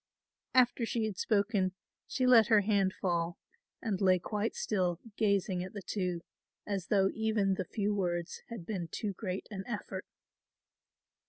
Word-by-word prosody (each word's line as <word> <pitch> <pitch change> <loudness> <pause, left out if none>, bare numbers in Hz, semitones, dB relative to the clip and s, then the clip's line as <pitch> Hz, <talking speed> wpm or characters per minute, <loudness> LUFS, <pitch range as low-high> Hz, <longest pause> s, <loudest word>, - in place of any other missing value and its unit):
After 245 -1 +4
she 230 -1 0
had 215 -3 -3
spoken 200 -3 +2 0.3
she 255 - 0
let 235 -4 +7
her 215 -2 +6
hand 200 -2 +2
fall 170 -2 -1 0.5
and 210 -5 -1
lay 185 -1 +5
quite 210 +4 -2
still 180 -5 0 0.2
gazing 200 -4 +1
at 185 - -8
the 205 -2 -6
two 180 -4 -2 0.4
as 195 -3 -2
though 195 -2 +3
even 220 -3 +1
the 185 -1 -2
few 205 +3 -1
words 175 -4 -2
had 230 -8 -7
been 185 -5 -3
too 205 +4 -3
great 190 -1 -4
an 195 -2 -4
effort. 220 -4 -5
200 Hz, 155 wpm, -32 LUFS, 185-220 Hz, 0.5 s, let